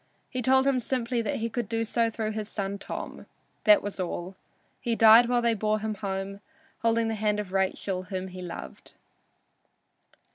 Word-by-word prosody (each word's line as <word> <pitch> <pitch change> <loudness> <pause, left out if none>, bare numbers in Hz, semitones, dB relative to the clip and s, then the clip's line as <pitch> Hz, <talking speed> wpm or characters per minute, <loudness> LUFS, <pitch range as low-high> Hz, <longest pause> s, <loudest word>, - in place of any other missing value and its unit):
He 255 - -2
told 265 +2 +4
him 275 -2 +3
simply 240 0 -1
that 215 - -2
he 230 - -1
could 230 -2 -3
do 230 0 0
so 230 +1 +1
through 220 -1 -3
his 215 -1 -4
son 200 -1 -3
Tom. - - -7 0.4
This 210 -1 +7
was 205 -1 -5
all. 180 +1 -4 0.4
He 235 -2 -1
died 225 +2 +8
while 245 -1 +2
they 235 -1 +3
bore 215 0 +1
him 215 0 -3
home, 195 -1 -4 0.4
holding 230 0 +2
the 225 - -1
hand 210 -1 0
of 200 -3 -5
Rachel, 190 -1 0
whom 190 -1 -4
he 185 0 -8
loved. 65 - -8
215 Hz, 180 wpm, -27 LUFS, 195-230 Hz, 0.4 s, died